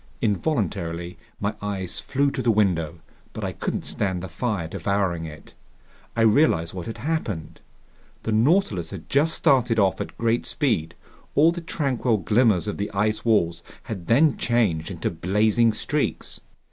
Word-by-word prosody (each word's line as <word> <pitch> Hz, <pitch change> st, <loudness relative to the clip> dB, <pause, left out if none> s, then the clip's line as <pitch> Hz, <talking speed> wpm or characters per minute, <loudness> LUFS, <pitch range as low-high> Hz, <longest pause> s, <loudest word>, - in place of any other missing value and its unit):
Involuntarily 95 Hz, -, -1 dB, 0.2 s
my 100 Hz, +1 st, -1 dB
eyes 95 Hz, -3 st, -4 dB
flew 140 Hz, +1 st, 0 dB
to 135 Hz, -, -3 dB
the 120 Hz, -, +1 dB
window, 90 Hz, -7 st, +2 dB, 0.4 s
but -, -, -6 dB
I -, -, -1 dB
couldn't -, -, -3 dB
stand 95 Hz, -3 st, -1 dB
the -, -, -4 dB
fire 100 Hz, -3 st, -2 dB
devouring 95 Hz, -1 st, -1 dB
it. 75 Hz, -1 st, -11 dB, 0.6 s
I 115 Hz, -, +1 dB
realized 110 Hz, -, +3 dB
what 90 Hz, -2 st, -6 dB
had 115 Hz, -, -5 dB
happened. 130 Hz, -, -3 dB, 0.6 s
The 110 Hz, -, -2 dB
Nautilus 110 Hz, -, +2 dB
had 95 Hz, -5 st, -9 dB
just 155 Hz, +4 st, +2 dB
started 130 Hz, -7 st, +3 dB
off 95 Hz, -3 st, +2 dB
at -, -, -6 dB
great 115 Hz, 0 st, +1 dB
speed. 105 Hz, -, 0 dB, 0.4 s
All 160 Hz, +3 st, +6 dB
the 175 Hz, 0 st, -5 dB
tranquil 130 Hz, -8 st, 0 dB
glimmers 105 Hz, -2 st, +2 dB
of 105 Hz, -, -3 dB
the 100 Hz, -, -2 dB
ice 105 Hz, +2 st, 0 dB
walls 85 Hz, -7 st, +2 dB, 0.2 s
had 95 Hz, -6 st, -6 dB
then 140 Hz, +5 st, +4 dB
changed 105 Hz, -10 st, +1 dB
into 90 Hz, -4 st, -3 dB
blazing 105 Hz, +7 st, +2 dB
streaks. 145 Hz, +7 st, -2 dB
105 Hz, 155 wpm, -24 LUFS, 90-120 Hz, 0.6 s, All